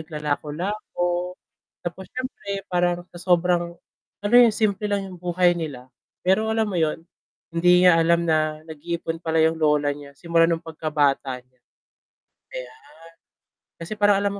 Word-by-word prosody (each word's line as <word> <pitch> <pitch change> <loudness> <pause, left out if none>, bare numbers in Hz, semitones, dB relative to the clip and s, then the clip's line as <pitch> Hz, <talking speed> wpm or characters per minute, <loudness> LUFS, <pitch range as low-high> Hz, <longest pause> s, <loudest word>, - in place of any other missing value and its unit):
naglalako-lako 160 +5 -3 0.7
tapos 175 +2 -6
siyempre 210 -6 -5
parang 175 0 0
sa - - -15
sobrang, 175 -1 +1 0.5
ano 205 +3 -1
yun 240 -2 +7
simple 210 -1 0
lang 200 -2 -1
yung 185 - -10
buhay 175 0 +2
nila 135 -6 -6 0.3
pero 215 +4 +2
alam 220 -1 +1
mo 190 - -3
yun, 160 -1 0 0.5
hindi 180 +1 +4
niya 180 -2 +7
alam 170 0 +2
na 155 -1 +1
nag-iipon 165 +1 -4
pala 160 0 +2
yung 160 +1 +3
lola 150 -2 +2
niya 145 -1 -12
simula 165 +3 +2
nung 165 -1 +1
pagkabata 145 -5 -1
niya. 125 +1 -35 1.0
Ayan, - - -8 1.0
kasi 205 +6 -7
parang 205 -1 +5
alam 200 - +1
170 Hz, 140 wpm, -23 LUFS, 155-190 Hz, 1.0 s, yun